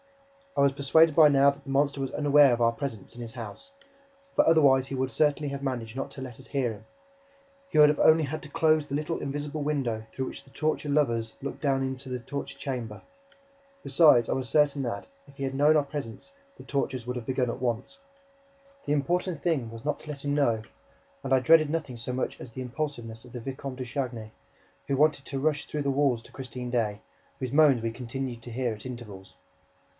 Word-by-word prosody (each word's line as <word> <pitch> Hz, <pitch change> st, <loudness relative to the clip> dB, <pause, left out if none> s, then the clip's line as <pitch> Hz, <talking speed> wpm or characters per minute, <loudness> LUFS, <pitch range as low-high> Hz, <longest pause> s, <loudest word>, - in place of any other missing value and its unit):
I -, -, +4 dB
was 140 Hz, -1 st, +5 dB
persuaded 150 Hz, +3 st, +4 dB
by 155 Hz, -2 st, +8 dB
now 140 Hz, 0 st, +5 dB
that 140 Hz, 0 st, -14 dB
the 140 Hz, -, -11 dB
monster 140 Hz, 0 st, +1 dB
was 135 Hz, -, -2 dB
unaware 145 Hz, -2 st, +5 dB
of 120 Hz, -, +1 dB
our 115 Hz, -1 st, +3 dB
presence 120 Hz, -6 st, -6 dB
in 120 Hz, -, -8 dB
his 115 Hz, -1 st, -7 dB
house, 125 Hz, -, -8 dB, 0.6 s
for -, -, +5 dB
otherwise 140 Hz, -5 st, +5 dB
he 135 Hz, -, -4 dB
would 130 Hz, 0 st, -1 dB
certainly 150 Hz, -1 st, +1 dB
have 140 Hz, 0 st, -5 dB
managed 120 Hz, -4 st, -3 dB
not 135 Hz, -, -4 dB
to 135 Hz, -, -9 dB
let 130 Hz, -3 st, -8 dB
us -, -, -13 dB
hear 130 Hz, -5 st, -1 dB
him. 110 Hz, +1 st, -14 dB, 0.8 s
He -, -, -2 dB
would 150 Hz, 0 st, +7 dB
only 160 Hz, 0 st, +6 dB
have 140 Hz, -, -4 dB
had 155 Hz, -, -4 dB
to 150 Hz, -, -10 dB
close 155 Hz, 0 st, +3 dB
the 140 Hz, -, -4 dB
little 155 Hz, +3 st, -2 dB
invisible 145 Hz, +2 st, -4 dB
window 130 Hz, -7 st, -1 dB
through 130 Hz, -, -3 dB
which -, -, -8 dB
the 135 Hz, -, -20 dB
torture 155 Hz, +1 st, -1 dB
lovers 115 Hz, -6 st, +1 dB
look 140 Hz, 0 st, -6 dB
down 135 Hz, -2 st, +1 dB
into 130 Hz, 0 st, -5 dB
the 125 Hz, 0 st, -3 dB
torture 140 Hz, +4 st, -6 dB
chamber. 120 Hz, -6 st, -5 dB, 0.8 s
Besides, 135 Hz, -4 st, +5 dB
I -, -, 0 dB
was 130 Hz, -2 st, -3 dB
certain 145 Hz, +1 st, +3 dB
that, 120 Hz, -3 st, -4 dB, 0.2 s
if 140 Hz, -, -17 dB
he 140 Hz, -, -4 dB
had 135 Hz, 0 st, -2 dB
known 145 Hz, +3 st, +4 dB
of 155 Hz, -, +5 dB
our 150 Hz, -, +3 dB
presence, 140 Hz, -, -7 dB, 0.2 s
the -, -, -11 dB
tortures 135 Hz, -4 st, -2 dB
would 125 Hz, 0 st, -3 dB
have 120 Hz, -2 st, -6 dB
begun 130 Hz, -2 st, 0 dB
at -, -, -8 dB
once. 125 Hz, -, -2 dB, 0.9 s
The 145 Hz, -, +1 dB
important 170 Hz, +3 st, 0 dB
thing 150 Hz, -10 st, 0 dB
was 115 Hz, +2 st, -10 dB
not 150 Hz, -, -1 dB
to 155 Hz, -, -12 dB
let 145 Hz, -1 st, -7 dB
him 145 Hz, -, 0 dB
know; 120 Hz, -7 st, +2 dB, 0.6 s
and 135 Hz, -, -4 dB
I 130 Hz, -, +6 dB
dreaded 155 Hz, +3 st, +5 dB
nothing 155 Hz, -5 st, -3 dB
so 115 Hz, +2 st, -5 dB
much 125 Hz, +1 st, -3 dB
as 120 Hz, -, -9 dB
the 130 Hz, -, -7 dB
impulsiveness 120 Hz, -4 st, -5 dB
of 125 Hz, -, -14 dB
the 125 Hz, -, -5 dB
Vicomte 135 Hz, +1 st, -6 dB
de 130 Hz, -, -4 dB
Chagny, 120 Hz, -4 st, -4 dB, 0.6 s
who 135 Hz, -, 0 dB
wanted 145 Hz, -1 st, +3 dB
to 135 Hz, -, -4 dB
rush 150 Hz, +1 st, 0 dB
through 150 Hz, -1 st, -3 dB
the 140 Hz, -, +1 dB
walls 135 Hz, -4 st, +1 dB
to -, -, -17 dB
Christine 125 Hz, -2 st, -7 dB
Daae, 110 Hz, -4 st, 0 dB, 0.4 s
whose 130 Hz, -1 st, -4 dB
moans 145 Hz, -5 st, +5 dB
we 115 Hz, -, -1 dB
continued 125 Hz, 0 st, -5 dB
to 120 Hz, -, -10 dB
hear 120 Hz, -1 st, -1 dB
at 105 Hz, +2 st, -11 dB
intervals. 110 Hz, -7 st, -9 dB
135 Hz, 220 wpm, -28 LUFS, 120-145 Hz, 0.9 s, by